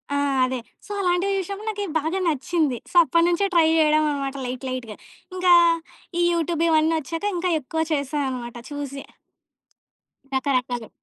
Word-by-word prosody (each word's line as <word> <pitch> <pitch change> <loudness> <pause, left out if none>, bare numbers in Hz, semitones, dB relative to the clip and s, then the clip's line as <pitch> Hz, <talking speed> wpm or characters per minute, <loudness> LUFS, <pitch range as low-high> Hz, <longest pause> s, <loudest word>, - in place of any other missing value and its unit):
ఆ! - - +1 0.3
అదే. 255 0 -3 0.3
సో, - - -9
అలాంటివి 365 +2 +1
చూశినప్పుడు 395 +3 -5
నాకి 410 -1 -3
బాగా 320 +5 -2
నచ్చింది. 310 -3 0
సో, - - -18
అప్పటినుంచే 340 +6 +2
ట్రై 330 - +6
జేయడం 310 -1 +4
అన్నమాట 275 -1 -3
లైట్ 250 +1 -5
లైట్‌గా. 240 -4 -5 0.4
ఇంకా 365 -1 +4 0.7
ఈ - - +4
యూట్యూబ్ 335 -1 0
ఇవన్నీ 315 +1 +3
ఒచ్చాక 330 +7 -5
ఇంకా 360 0 0
ఎక్కువ 320 +4 -3
చేశా 290 0 -1
అన్నమాట 240 -2 -6 0.2
చూసి. 280 -1 -5 1.3
రకరకాలు. 250 -3 -1
310 Hz, 140 wpm, -23 LUFS, 265-350 Hz, 1.3 s, ట్రై